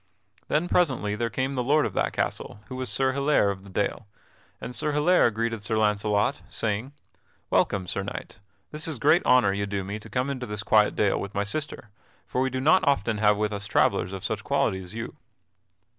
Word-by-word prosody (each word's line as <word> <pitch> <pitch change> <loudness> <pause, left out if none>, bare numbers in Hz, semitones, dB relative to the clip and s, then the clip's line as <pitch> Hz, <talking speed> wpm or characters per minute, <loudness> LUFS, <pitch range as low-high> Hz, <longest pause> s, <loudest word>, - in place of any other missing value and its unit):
Then 155 +4 +1
presently 130 -14 +1
there 115 +2 -1
came 130 +5 -2
the 125 -2 -1
lord 150 +4 +3
of - - -3
that - - 0
castle, - - -3
who 130 - -6
was 130 -1 -4
Sir 130 -1 +1
Hilaire 140 -6 +2
of 95 -1 -8
the 100 - -13
Dale. 105 +3 -2 0.5
And 125 - -6
Sir 150 +4 -1
Hilaire 150 -1 +4
greeted 115 0 -2
Sir 110 +1 -1
Launcelot, 105 +4 +1
saying: 110 +5 -2 0.6
"Welcome, 95 -2 +2
Sir 100 - -2
Knight. 100 -1 -7 0.3
This 150 +1 -3
is 155 -4 -3
great 165 +9 +4
honor 125 -6 +5
you 100 0 -2
do 100 -1 -2
me 100 +3 -5
to - - -13
come 130 +2 -1
into 130 -2 -5
this 105 0 -4
quiet 105 -1 +4
dale 100 -2 +2
with 100 0 -7
my 100 - +1
sister, 120 -1 -4 0.3
for 125 +5 -2
we 130 - +1
do 130 0 -3
not 155 +8 +4
often 115 -6 +1
have 105 -1 +4
with 105 0 -1
us 100 0 -5
travellers 90 - +2
of 95 -1 -6
such - - -2
quality 95 - 0
as 90 +3 -10
you." 115 - -6
110 Hz, 210 wpm, -26 LUFS, 100-135 Hz, 0.6 s, honor